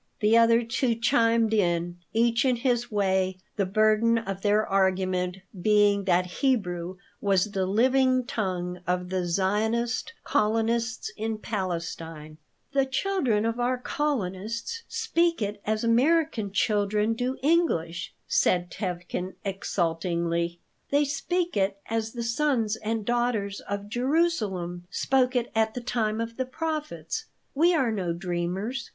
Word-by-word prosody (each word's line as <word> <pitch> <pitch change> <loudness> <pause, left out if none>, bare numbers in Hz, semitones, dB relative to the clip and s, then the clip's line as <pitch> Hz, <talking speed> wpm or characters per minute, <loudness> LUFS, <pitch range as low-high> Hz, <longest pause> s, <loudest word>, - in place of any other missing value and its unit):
The 215 +1 +4
other 230 0 +5
two 235 +1 0
chimed 230 -2 +3
in, 175 -3 +1
each 230 +2 +2
in 255 -2 +3
his 240 -1 0
way, 190 -2 +1 0.2
the 195 -3 0
burden 215 +3 +3
of 195 -4 -4
their 210 +1 +3
argument 185 -1 +1 0.2
being 205 -1 +4
that 180 -1 +3 0.2
Hebrew 185 -9 0 0.2
was 200 0 +2
the 190 -2 -1
living 255 +4 +3
tongue 180 -7 -3
of 180 0 -1
the 185 -1 -1
Zionist 220 - 0
colonists 230 +3 0
in 220 0 -2
Palestine 165 -6 -5 0.3
"The 275 -1 +2
children 265 - 0
of 230 +1 -1
our 250 +1 +1
colonists 230 - -2
speak 345 -7 +1
it 205 -1 -3
as 215 +1 0
American 245 -2 +2
children 210 +1 +1
do 250 +3 -2
English," 225 - +1 0.2
said 175 -1 +2
Tevkin, 180 -1 -4
exultingly. 170 -2 -1 0.3
"They 290 +1 +3
speak 350 +5 -1
it 195 0 +1
as 225 0 -2
the 240 -1 -4
sons 230 -3 +1
and 220 0 -3
daughters 235 -4 0
of 200 0 -3
Jerusalem 215 - 0
spoke 255 +5 +1
it 240 -1 0
at 220 0 +1
the - - -2
time 225 -3 -1
of 230 0 -4
the 260 -1 -2
prophets. 310 +8 -4 0.3
We 340 +5 +4
are 260 -7 +2
no 185 -5 -1
dreamers. 180 +8 -3
220 Hz, 135 wpm, -27 LUFS, 190-245 Hz, 0.3 s, other